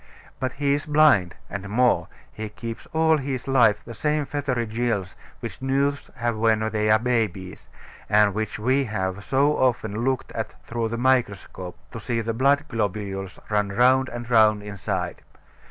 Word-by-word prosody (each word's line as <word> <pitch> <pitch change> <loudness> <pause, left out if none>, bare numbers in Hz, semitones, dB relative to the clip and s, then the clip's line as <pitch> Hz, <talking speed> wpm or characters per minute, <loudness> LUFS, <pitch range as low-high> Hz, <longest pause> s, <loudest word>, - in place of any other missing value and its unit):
But 130 -1 -2
he 140 0 +1
is 145 +1 -2
blind; 145 - +4
and 100 0 -6
more, 125 +4 +2 0.3
he 110 0 -5
keeps 115 +1 -7
all 160 0 +3
his 135 -2 -4
life 115 -6 +4
the 115 - -8
same 150 +4 0
feathery 135 -5 -2
gills 110 -4 -2 0.3
which - - -7
newts 140 +2 0
have 120 -2 -1
when 110 0 +2
they 105 0 0
are 110 - +6
babies, 110 -6 -2 0.4
and 105 -1 +4
which 110 +1 -3
we 130 +5 +1
have 95 -3 -3
so 140 +5 +2
often 115 -4 0
looked 130 0 -1
at - - -5
through 115 -1 -2
the 115 - -3
microscope, 105 -8 -1
to 115 - -7
see 115 +1 -2
the 115 0 -2
blood 140 +5 +3
globules 100 - -3
run 105 -1 +1
round 130 +5 +3
and 120 0 -6
round 110 -2 +5
inside. 100 -4 -4
115 Hz, 165 wpm, -24 LUFS, 105-130 Hz, 0.4 s, are